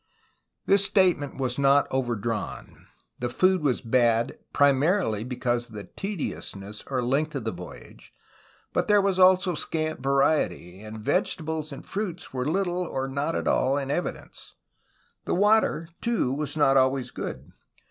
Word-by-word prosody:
This 200 0 +4
statement 185 -8 +2
was 130 -1 -2
not 140 +1 +5
overdrawn. 120 -4 -3 0.3
The 125 - -2
food 185 +7 +2
was 140 -5 +1
bad 115 -1 +2
primarily 140 - +2
because 120 -1 -2
of 110 - -13
the 105 - -6
' - - -21
'tediousness, 105 - -5
'' - - -34
or 130 -2 -1
length, 145 +5 0
of 135 - -3
the 110 - -2
voyage, 90 0 -11 0.6
but - - 0
there 210 -1 +5
was 195 -1 +1
also 185 0 +5
scant 155 0 -2
variety, 135 - +1
and 110 +1 -8
vegetables 160 - -1
and 140 0 -9
fruits 190 -7 -5
were 125 -1 -2
little 180 +2 0
or 135 -6 -3
not 140 +4 -2
at - - -2
all 135 +2 +2
in 140 -1 -2
evidence. 175 - -5 0.7
The - - 0
water, 205 -4 +3
too, 230 - 0
was 150 +2 -3
not 135 -2 +4
always 130 -1 +2
good. 65 +2 -6
140 Hz, 155 wpm, -26 LUFS, 120-175 Hz, 0.7 s, not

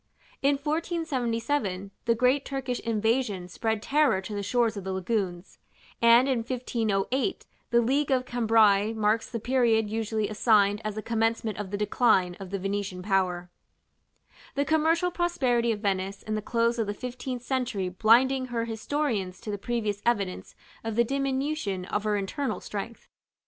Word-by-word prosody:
In 280 +1 +3
1477, 275 - -2
the 230 - +3
great 255 +4 +3
Turkish 265 -3 -3
invasion 220 -4 0
spread 220 +3 -2
terror 285 -8 +3
to 190 +3 -7
the 205 - -2
shores 230 +2 +1
of 200 - -5
the 190 - -3
lagoons; 190 -2 -3 0.4
and 235 +3 +6
in 260 -3 +1
1508 240 - -1 0.2
the 235 0 +4
league 275 +5 +1
of 255 -2 +2
Cambrai 220 -3 +3
marks 220 0 +1
the 230 - -4
period 225 -3 +2
usually 220 -1 -1
assigned 210 -1 +3
as 215 -1 -3
the 215 - -5
commencement 225 -2 0
of 205 -2 -4
the 205 - -3
decline 205 -4 +2
of 195 -2 -8
the 200 - -2
Venetian 195 -1 -3
power; 180 -3 0 1.0
the 280 +1 +1
commercial 320 +4 +2
prosperity 260 -10 +1
of 210 -2 -3
Venice 195 -1 -2
in 215 - -4
the 215 - -1
close 235 +1 0
of 220 - 0
the 205 - -3
fifteenth 250 +1 -5
century 250 -7 -1
blinding 250 +7 +3
her 235 -2 -2
historians 225 -4 -2
to 215 - -5
the 205 - -3
previous 215 -3 -2
evidence 200 -6 -1 0.3
of 225 -1 -3
the 235 - +4
diminution 270 -6 -2
of 205 +2 -2
her 210 -1 +1
internal 220 +5 -2
strength. 215 +3 -7
225 Hz, 160 wpm, -27 LUFS, 205-255 Hz, 1.0 s, and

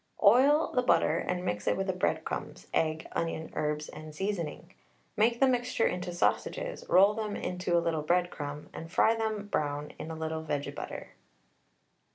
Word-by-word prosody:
Oil 270 +9 +6
the 250 - +3
butter 250 - +3
and 180 0 -2
mix 105 0 -2
it - - +2
with 195 - -1
the 190 - 0
breadcrumbs, 180 - -2
egg, 160 0 0
onion, 165 -1 -3
herbs, 150 0 -1
and 155 0 -10
seasoning. 180 -2 -3 0.4
Make 235 +3 +3
the 270 - +5
mixture 245 -2 +1
into 180 0 -1
sausages, - - -1
roll 195 +3 +6
them 210 -1 -3
into 180 -1 -1
a 170 - +1
little 160 -2 0
breadcrumb, 150 -4 -1
and 165 +1 -8
fry 225 - +4
them 220 -2 -2
brown 145 -6 -2
in 160 - -6
a 160 - -5
little 160 0 -3
vege 145 -2 -2
butter. - - -7
180 Hz, 170 wpm, -30 LUFS, 160-215 Hz, 0.4 s, Oil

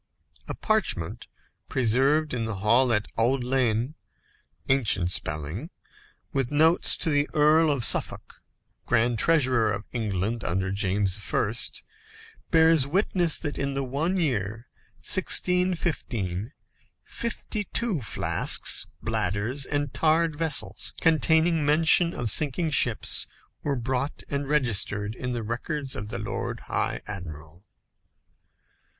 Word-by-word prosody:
A - - -5
parchment 215 - -1 0.4
preserved 135 +5 +2
in 115 -2 -2
the 110 -2 -4
hall 115 +6 +3
at 105 -1 +1
Audlyene 125 0 0 0.7
(ancient 110 -9 +1
spelling), 80 - -2 0.6
with 135 -3 -1
notes 160 +3 +3
by 160 - +1
the 145 0 +1
Earl 155 +2 +4
of 135 -4 0
Suffolk, - - 0 0.5
Grand 115 0 +1
Treasurer 130 -9 +2
of 105 - -4
England 110 -1 -2
under 95 +2 -1
James 100 -1 0
I., 105 - 0 1.0
bears 160 -3 +4
witness 175 0 +1
that 150 -3 -5
in 140 0 -2
the 135 - -1
one 150 +9 -2
year, 115 - -2 0.4
1615, 165 - 0 0.5
fifty 225 -2 -4
two 205 - -2
flasks, 105 - +2 0.2
bladders, 110 +9 -2
and 145 -2 -2
tarred 160 0 +2
vessels, 160 -1 -1
containing 160 0 +3
mention 165 +4 +4
of 115 -4 0
sinking 155 - +1
ships, 120 -6 +1 0.3
were 140 - -1
brought 130 +3 -3
and 140 0 -3
registered 105 -7 0
in 125 +1 -5
the 120 -2 -4
records 135 +5 -3
of 105 - -6
the 115 +3 -5
Lord 110 - -5
High - - -2
Admiral. 85 -2 -9
130 Hz, 115 wpm, -25 LUFS, 110-155 Hz, 1.0 s, Earl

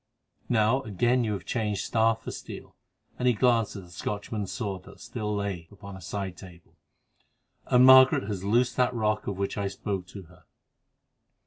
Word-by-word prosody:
Now, 115 +3 +3
again 120 +5 +1
you 110 -2 -1
have 95 -3 -6
changed 105 -4 -2
staff 115 0 +1
for - - -5
steel," - - -9 0.4
and 125 - +1
he 125 - +4
glanced 115 -2 +2
at 100 - -7
the 90 - -16
Scotchman's 105 +2 -4
sword 100 -5 -4
that - - -14
still 105 -3 -4
lay 100 -5 -3
upon 100 -1 -11
a 95 - -11
side 95 +1 -5
table, 90 -3 -14 0.9
"and 125 0 +5
Margaret 130 -3 +8
has 100 -2 -4
loosed 120 +5 +1
that 125 -1 +2
rock 110 -2 0
of 100 - -3
which 100 +1 -2
I 100 - -1
spoke 95 -1 -4
to 95 0 -10
her." 85 -1 -20
105 Hz, 180 wpm, -27 LUFS, 95-115 Hz, 0.9 s, Margaret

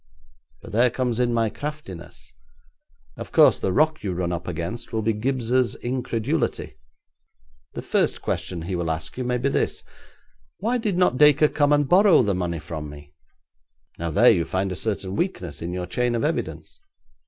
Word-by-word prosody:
But - - -10
there 120 +4 +4
comes 125 -1 -2
in 120 -1 +2
my 115 -2 +1
craftiness. 95 - -8 0.8
Of - - -8
course, - - +5
the 95 - -1
rock 155 +7 +2
you 95 -3 -2
run 90 0 -2
up 85 0 -4
against 85 +7 -5
will 110 -1 -1
be 110 +1 +1
Gibbes's 125 +2 0
incredulity. 125 +2 -2 1.0
The - - -6
first - - +1
question 85 -3 -3
he 90 +2 -3
will 85 -2 -2
ask 80 +1 -3
you 130 - -3
may 125 0 0
be 135 +3 0
this: - - -1 0.7
"Why 235 +7 0
did 210 -6 -1
not 180 -8 +2
Dacre 150 +1 +6
come 145 -1 +1
and 145 -1 +3
borrow 180 -4 +6
the 100 -2 +1
money 90 -2 -2
from 75 -1 -6
me?" 75 0 -13 0.9
Now 85 0 -2
there 120 +11 +6
you 90 -6 +2
find 95 +3 -2
a - - -3
certain 100 -1 -3
weakness 90 - -3
in 85 - -4
your 90 0 -3
chain 120 +7 -1
of 115 - -1
evidence. - - -3
115 Hz, 175 wpm, -24 LUFS, 90-135 Hz, 1.0 s, Dacre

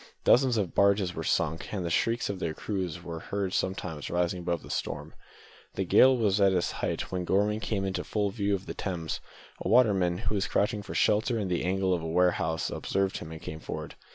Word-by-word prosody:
Dozens 125 -2 +5
of 100 -5 -1
barges 100 -2 +3
were 80 - -4
sunk, 80 0 0
and 95 -4 -3
the 85 - -2
shrieks 115 +6 +1
of 100 -2 -4
their 80 -3 -2
crews 90 -5 -3
were 85 -2 -5
heard 100 +1 -3
sometimes 90 -5 -2
rising 90 +1 0
above 85 -1 -2
the - - -8
storm. - - -4 0.6
The 95 - -1
gale 130 +8 +6
was 105 -3 +2
at 100 -1 +5
its 90 -2 +1
height - - -3
when 90 -1 -2
Gorman 105 +4 +1
came 100 -2 -2
into 95 -1 -2
full 105 -2 -1
view 100 -2 0
of 95 0 -7
the - - -5
Thames. 85 -5 -3 0.4
A - - -3
waterman, 100 -8 +4
who 100 +2 -2
was 100 -1 0
crouching 105 0 +1
for 100 - -8
shelter 110 +3 +2
in 100 -4 -2
the 90 - 0
angle 95 +1 +1
of 85 - -1
a 80 - -4
warehouse, 80 -1 +1
observed 95 0 -1
him, 80 - -8
and 80 - -7
came 80 - -6
forward. - - -6
95 Hz, 215 wpm, -29 LUFS, 85-105 Hz, 0.6 s, gale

